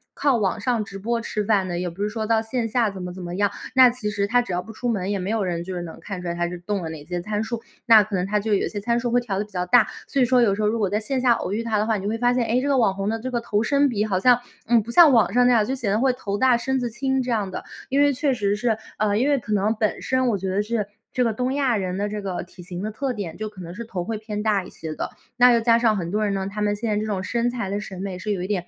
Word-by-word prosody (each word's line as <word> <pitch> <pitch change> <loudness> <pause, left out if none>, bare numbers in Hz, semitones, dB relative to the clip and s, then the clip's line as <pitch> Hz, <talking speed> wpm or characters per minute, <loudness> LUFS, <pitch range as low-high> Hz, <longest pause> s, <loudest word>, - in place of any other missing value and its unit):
靠 280 -3 +2
网 205 -2 0
上 230 0 0
直 195 -1 -9
播 230 +3 -1
吃 210 -2 -3
饭 200 -3 +2
的， 175 0 -2
也 180 0 -2
不 190 +5 -5
是 210 - 0
说 215 0 -3
到 225 -1 +3
线 225 +1 -2
下 225 -1 +1
怎 195 -1 -8
么 180 0 -5
怎 185 0 -8
么 175 0 -5
样。 205 +1 +2 0.2
那 255 -1 +8
其 235 -4 -4
实 200 -1 -1
她 245 +3 +3
只 240 - -6
要 180 - 0
不 225 +4 -11
出 245 +2 -3
门， 195 -3 -1
也 200 - 0
没 185 +1 -3
有 220 -3 0
人 170 -2 -2
就 185 +2 -6
是 175 - -3
能 165 - -8
看 195 -3 -6
出 180 - -6
来 170 - -2
她 175 0 0
是 180 - -6
动 195 0 -3
了 160 - -4
哪 150 -2 -8
些 175 +1 -3
参 210 +2 -2
数， 230 0 -4 0.2
那 225 -3 +8
可 205 0 -4
能 180 - 0
她 210 +1 +1
就 210 0 -1
有 195 - +1
些 205 -2 -5
参 235 +2 +1
数 240 -1 -2
会 245 0 +3
调 200 -5 -3
得 210 - -1
比 210 - -22
较 180 -2 -2
大。 220 +3 +5 0.2
所 275 - 0
以 - - +5
说 250 +1 +4
有 210 -5 +4
时 215 - -3
候 210 - +2
如 225 +2 +1
果 200 -4 +1
在 210 +2 0
线 255 +3 -2
下 250 -2 +4
偶 200 - -3
遇 225 - -1
她 225 -2 0
的 210 - +1
话， 225 - +2
你 195 - -6
就 205 - -1
会 225 - -1
发 245 +1 +2
现， 245 -2 +1
诶， 235 +3 +1
这 280 - -2
个 275 -2 +3
网 210 -6 +3
红 195 0 -3
的 225 - -1
这 255 +3 -5
个 240 - 0
头 215 -2 0
身 285 +2 +3
比 210 -5 0
好 190 -3 0
像， 245 +4 +5 0.3
嗯， 235 -1 +4
不 235 - -7
像 330 +4 +8
网 225 -4 +4
上 245 0 +5
那 250 - +5
样， 220 -3 +4
就 260 - -2
显 235 -6 -2
得 205 - +2
会 265 0 +3
头 205 -5 -4
大、 255 0 +4
身 265 +2 -1
子 240 - -1
轻 265 +3 -1
这 250 -1 -3
样 210 -4 0
的。 - - -6 0.2
因 275 +2 +2
为 285 0 +5
确 275 +1 0
实 205 -3 0
是 220 0 0 0.2
呃， 210 -1 +1
因 260 +6 +2
为 285 - +3
可 215 -1 -4
能 210 +2 +2
本 215 -1 -1
身 260 -1 +1
我 215 -4 +1
觉 190 0 -3
得 195 +2 +1
是 215 0 -1 0.3
这 250 - +2
个 230 -2 +1
东 250 +3 -1
亚 270 -4 +2
人 185 -1 -2
的 205 +1 -1
这 210 0 -4
个 185 -3 -4
体 180 +1 -14
型 175 +1 -6
的 215 - -3
特 260 +4 -2
点， 195 -7 -6
就 215 - -4
可 195 -3 -12
能 170 0 -8
是 230 +5 -7
头 190 -5 -4
会 220 +4 -3
偏 210 -1 -5
大 210 -3 +2
一 - - -11
些 160 -1 -7
的， - - -4 0.3
那 245 0 +7
又 235 - +4
加 230 0 +4
上 225 -2 +3
很 170 -2 -3
多 215 +1 0
人 200 - 0
呢， 190 -1 -2
他 210 +1 -4
们 205 0 +1
现 225 +3 -4
在 210 - +1
这 215 - -1
种 200 -3 -2
身 235 +4 0
材 235 -6 -4
的 200 +1 -2
审 190 -2 -7
美 190 -2 -5
是 210 +3 -3
有 195 -3 -1
一 - - -3
点 190 -4 -2
215 Hz, 370 characters per minute, -23 LUFS, 195-240 Hz, 0.3 s, 那